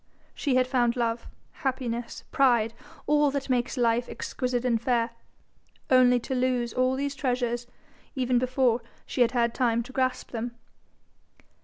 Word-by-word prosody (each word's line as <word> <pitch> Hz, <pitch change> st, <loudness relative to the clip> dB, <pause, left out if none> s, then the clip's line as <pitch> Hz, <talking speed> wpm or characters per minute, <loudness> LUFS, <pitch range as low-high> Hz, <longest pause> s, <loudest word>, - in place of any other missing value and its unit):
She 275 Hz, -4 st, 0 dB
had 255 Hz, 0 st, +4 dB
found 245 Hz, -2 st, +1 dB
love, 235 Hz, -1 st, -1 dB, 0.2 s
happiness, 245 Hz, -3 st, -3 dB
pride, 235 Hz, -5 st, +3 dB, 0.3 s
all 295 Hz, 0 st, +4 dB
that 275 Hz, -1 st, -3 dB
makes 250 Hz, +1 st, 0 dB
life 235 Hz, 0 st, +2 dB
exquisite 250 Hz, -1 st, -3 dB
and 230 Hz, -3 st, +2 dB
fair, 235 Hz, -1 st, +1 dB, 0.8 s
only 250 Hz, -1 st, +6 dB
to 265 Hz, -, -4 dB
lose 250 Hz, -2 st, 0 dB
all 255 Hz, +1 st, +2 dB
these 280 Hz, +1 st, -2 dB
treasures 245 Hz, -3 st, -1 dB, 0.5 s
even 250 Hz, -2 st, +2 dB
before 255 Hz, -1 st, +2 dB, 0.2 s
she 255 Hz, -, -2 dB
had 240 Hz, 0 st, +4 dB
had 235 Hz, -2 st, +2 dB
time 235 Hz, -2 st, +1 dB
to 260 Hz, -, -12 dB
grasp 255 Hz, -1 st, -1 dB
them. 235 Hz, 0 st, -4 dB
250 Hz, 145 wpm, -27 LUFS, 235-260 Hz, 0.8 s, only